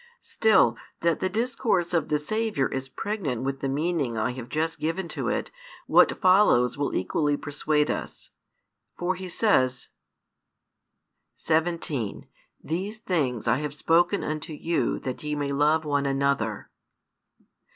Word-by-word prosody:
Still, 220 -1 +3 0.2
that 170 -1 +2
the 185 - 0
discourse 220 -6 0
of 165 -3 +1
the 150 - +2
Saviour 215 -2 -1
is 130 0 -4
pregnant 155 - -3
with 135 0 -2
the 135 - -2
meaning 145 -4 -1
I 110 +3 0
have 125 -1 -8
just 160 +1 -1
given 165 +3 -2
to - - -4
it - - -2 0.3
what - - +4
follows 185 - +4
will 145 0 -2
equally 145 - 0
persuade 150 +1 0
us. - - -6 0.7
For 175 +1 0
he 185 0 -7
says: 130 - +1 1.5
17 160 -8 -1 0.4
These 190 +7 -3
things 140 - -1
I 115 +2 +3
have 150 0 -4
spoken 175 +6 +2
unto 155 0 -4
you 165 +3 -1
that 130 -1 -5
ye 150 0 -3
may 145 -1 -2
love 150 +3 +2
one 145 -1 0
another. 135 -6 -1
150 Hz, 140 wpm, -26 LUFS, 135-175 Hz, 1.5 s, what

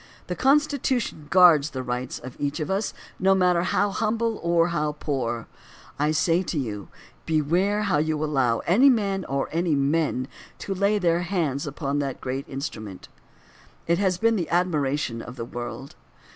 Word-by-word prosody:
The 180 - -4
Constitution 265 - +1
guards 170 -5 +6
the 130 -3 -5
rights 125 0 -3
of 125 0 -9
each 145 0 -2
one 160 - -1
of 170 - -4
us, 200 +3 -1 0.2
no 190 +1 +4
matter 180 -2 +3
how 200 +3 +1
hmnble 225 +1 -1
or 170 0 +2
how 150 -3 -1
poor. 125 -6 -3 0.5
I 150 +1 +2
say 170 +2 +2
to 175 -3 -3
you 105 -7 -4 0.4
beware 175 +7 +1
how 190 -8 +1
you 155 0 0
allow 130 -6 +1
any 240 +11 +5
man 200 -7 +1
or 135 0 -1
any 165 -1 +1
men 140 -2 0 0.3
to 195 - -4
lay 200 +2 +2
their 170 -3 +2
hands 165 -7 -1
upon 145 0 -2
that 140 -2 -3
great 130 +2 -4
instrument. 110 -9 -6 0.8
It 170 +1 +1
has 190 -3 +1
been 230 +2 +2
the 175 - -2
admiration 145 -8 0
of 120 - -9
the 115 -3 -5
world. 120 +2 -7
160 Hz, 170 wpm, -25 LUFS, 140-190 Hz, 0.8 s, guards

